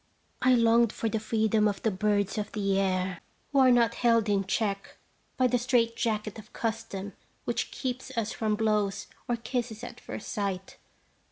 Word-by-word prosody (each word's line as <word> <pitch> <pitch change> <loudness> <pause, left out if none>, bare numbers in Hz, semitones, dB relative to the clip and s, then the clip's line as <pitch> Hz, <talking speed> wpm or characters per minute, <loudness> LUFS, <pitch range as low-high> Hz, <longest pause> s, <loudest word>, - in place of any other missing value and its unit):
I 255 0 +5
longed 230 -1 +4
for 225 - -2
the 220 - -1
freedom 215 -1 +2
of 200 -2 -3
the 220 - +2
birds 205 +1 0
of 210 - -4
the 195 -2 +1
air, 185 -2 0 0.3
who 280 - +3
are 260 -1 +7
not 235 -2 +4
held 230 -3 +3
in 200 -1 +2
check 200 -1 -2 0.4
by 255 - +3
the 245 0 +3
straight 235 -2 +2
jacket 215 -1 -2
of 215 - -14
custom 220 -3 -3 0.3
which - - -1
keeps 255 0 -4
us 230 -1 0
from 215 -1 0
blows 210 -2 0 0.2
or 240 - +1
kisses 235 -1 -4
at - - -8
first - - -7
sight. 195 -4 -3
220 Hz, 175 wpm, -28 LUFS, 205-235 Hz, 0.4 s, are